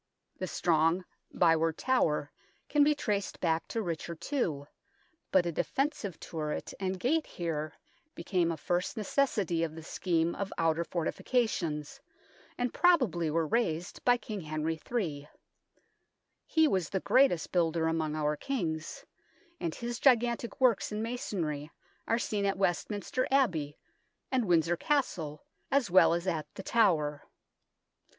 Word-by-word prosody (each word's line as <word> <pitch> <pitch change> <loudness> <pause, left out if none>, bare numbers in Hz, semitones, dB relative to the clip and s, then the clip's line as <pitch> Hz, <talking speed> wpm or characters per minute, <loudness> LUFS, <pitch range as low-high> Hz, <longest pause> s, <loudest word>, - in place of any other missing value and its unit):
The 185 - -2
strong 165 +2 +2 0.3
Byward 165 -1 +3
Tower 150 - +1 0.4
can 295 0 +4
be 300 +1 +4
traced 205 -8 -2
back 165 -2 0
to 225 - -2
Richard 170 -1 -5
II, 160 - 0 0.7
but 185 -2 +4
a 170 - 0
defensive 245 - -2
turret 155 -2 -4
and 190 -1 -2
gate 305 - +1
here 155 -3 -3 0.4
became 175 -3 0
a 165 - -3
first 180 +8 -1
necessity 205 -6 +1
of 160 -1 -3
the 160 - -8
scheme 170 0 0
of 200 0 -4
outer 165 0 +2
fortifications, 170 - -1 0.6
and 245 -1 -1
probably 250 - +3
were 165 +1 +1
raised 175 -3 -1
by 245 0 +5
King 215 -3 -6
Henry 155 +1 -2
III. 155 -12 -2 1.2
He 320 -1 +4
was 185 - 0
the 195 - -1
greatest 255 -6 +3
builder 165 -2 +1
among 160 -1 0
our 150 -1 0
Kings, 160 - -3 0.5
and 165 -1 -3
his 240 0 -4
gigantic 240 -1 +2
works 245 -7 +3
in 210 +1 -2
masonry 170 -11 -3 0.4
are 230 - +2
seen 205 -3 -1
at 195 - 0
Westminster 200 +6 -1
Abbey 170 - +1 0.5
and 255 -3 +2
Windsor 170 -1 +3
Castle 165 - -1 0.2
as 270 -8 +1
well 180 -2 +6
as 170 +1 -3
at 165 -5 -1
The 195 - -7
Tower. 160 -12 +2
175 Hz, 135 wpm, -30 LUFS, 160-235 Hz, 1.2 s, well